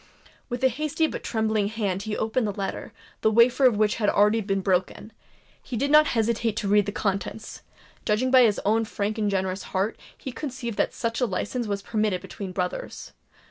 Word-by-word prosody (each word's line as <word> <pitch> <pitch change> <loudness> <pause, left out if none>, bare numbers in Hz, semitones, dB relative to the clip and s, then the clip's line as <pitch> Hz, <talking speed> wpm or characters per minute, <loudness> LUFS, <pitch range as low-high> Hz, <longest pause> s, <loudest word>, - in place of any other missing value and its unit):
With 245 +1 -4
a - - +7
hasty 305 +5 0
but - - -4
trembling 220 -2 0
hand 205 -3 -2
he 210 0 -3
opened 225 +1 0
the - - -1
letter, 195 0 -5 0.3
the 220 - +4
wafer 235 +4 +4
of 240 -5 +5
which 215 0 +2
had 210 -3 +2
already 210 +2 +3
been 195 -1 -1
broken;—he 195 +5 -4
did 280 +5 0
not 305 0 +7
hesitate 225 0 +1
to 210 - -1
read 205 0 +3
the - - -1
contents;—judging 215 +3 -3
by 260 -1 +7
his 220 -4 +3
own 220 +2 +3
frank 215 0 -3
and 210 -1 +1
generous 190 -1 -1 0.2
heart, 200 +4 -1 0.2
he 265 - -6
conceived 245 -4 -5
that - - 0
such 230 +1 -2
a 250 - +3
licence 220 +4 -3
was 200 -1 -3
permitted 210 -4 0
between 195 -2 -7
brothers. 180 -1 -4
220 Hz, 185 wpm, -25 LUFS, 200-235 Hz, 0.3 s, a